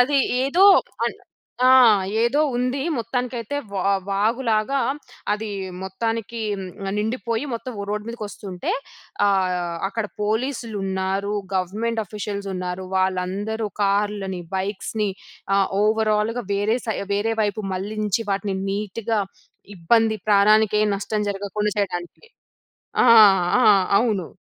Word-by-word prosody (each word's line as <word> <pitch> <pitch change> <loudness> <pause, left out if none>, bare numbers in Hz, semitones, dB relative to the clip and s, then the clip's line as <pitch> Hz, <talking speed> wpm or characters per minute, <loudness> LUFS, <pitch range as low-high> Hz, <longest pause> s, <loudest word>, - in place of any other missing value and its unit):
అది 275 +3 +4 0.3
ఏదో 345 +8 +4 0.4
అన్ - - -3 0.5
ఆ! - - +7 0.5
ఏదో 245 +6 +2 0.2
ఉంది. 250 +2 -1 0.2
మొత్తానికైతే 245 +2 -3 0.2
వా 195 0 +1 0.2
వాగులాగా 220 +4 +1 0.5
అదీ 215 +1 -3 0.3
మొత్తానికి 225 +4 -3 0.5
ఆహ్, - - -1
నిండిపోయి 230 +3 -2
మొత్తం 250 +2 -5
ఓ - - -3
రోడ్ 210 0 -2
మీదకొస్తుంటే, 205 -5 -5 0.6
ఆహ్, 180 -3 0
అక్కడ 225 0 -3 0.2
పోలీసులున్నారు, 205 -4 -2 0.2
గవర్నమెంట్ 215 +5 -1
ఆఫీషియల్సున్నారు. 195 -3 -4
వాళ్ళందరూ 190 +4 -1
కార్‌లని, 200 -2 0 0.2
బైక్స్‌ని 205 +2 -2 0.5
ఆహ్ 195 -1 +3
ఓవరాల్‌గా 215 +2 +1
వేరే 205 +3 +1
సై 220 - -1 0.2
వేరే 215 +3 0
వైపు 210 +1 -1
మళ్ళించి 210 +3 -2
వాటిని 195 0 -1
నీట్‌గా, 210 +2 -2 0.6
ఇబ్బంది, 220 +5 +2
ప్రాణానికేం 210 +1 +4
నష్టం 210 +1 -2
జరగకుండా 205 +1 -2
చెయడానికి. 175 - -3 0.8
ఆ! - - +5 0.6
ఆ! - - +4 0.4
అవును. 205 -8 0
210 Hz, 105 wpm, -22 LUFS, 195-225 Hz, 0.8 s, ఆ